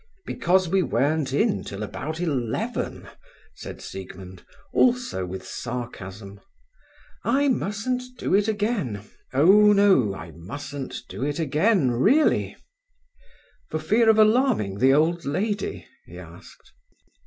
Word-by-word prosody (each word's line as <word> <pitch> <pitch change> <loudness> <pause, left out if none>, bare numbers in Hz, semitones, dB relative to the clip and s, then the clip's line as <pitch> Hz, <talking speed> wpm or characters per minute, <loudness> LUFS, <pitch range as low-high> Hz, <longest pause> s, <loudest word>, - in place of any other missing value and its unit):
"Because 185 +1 +1
we 190 +3 +2
weren't 145 0 0
in 200 - +1
till 100 +2 -6
about 155 +9 -5
eleven?" 135 -10 -3 0.5
said - - -9
Siegmund, 95 -1 -9 0.3
also 245 - +1
with 95 +1 -7
sarcasm. 100 -4 -7 0.8
"I 275 +4 +2
mustn't 235 +2 -1 0.2
do - - -2
it 205 +2 +3
again. 205 - -1 0.3
Oh 195 +10 +6
no, 190 - +4
I 80 -1 -9
mustn't 135 - -7
do - - -6
it 145 0 -2
again, 160 - +2
really." 220 - +2 1.1
"For - - -2
fear 220 +9 +2
of 220 - +5
alarming 215 - +3
the 130 +1 +5
old 165 +4 +2
lady?" 205 +9 -3 0.2
he - - -11
asked. - - -14
155 Hz, 120 wpm, -24 LUFS, -, 1.1 s, Oh